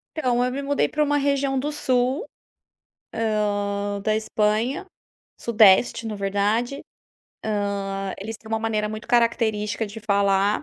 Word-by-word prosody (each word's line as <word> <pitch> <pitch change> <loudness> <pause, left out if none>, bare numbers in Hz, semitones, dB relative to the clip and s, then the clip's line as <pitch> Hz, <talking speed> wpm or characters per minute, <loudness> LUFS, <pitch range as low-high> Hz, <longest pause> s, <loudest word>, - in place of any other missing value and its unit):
Então 250 -6 +1
eu 250 - 0
me 275 +2 -3
mudei 285 0 +1
para 300 - +1
uma 290 0 +1
região 280 -1 +1
do 295 +3 -2
sul, 260 - 0 0.9
hã, 205 -2 -1
da 215 +1 +1
Espanha, 220 - 0 0.5
sudeste 225 0 +4
na 220 - -3
verdade, 205 +6 0 1.1
hã, 195 0 -3
eles 220 +3 -6
têm 220 - -15
uma 225 - 0
maneira 220 -1 -1
muito 215 +1 -7
característica 225 -2 +1
de 210 +2 -9
falar, 200 +1 +2
220 Hz, 135 wpm, -24 LUFS, 205-250 Hz, 1.1 s, sudeste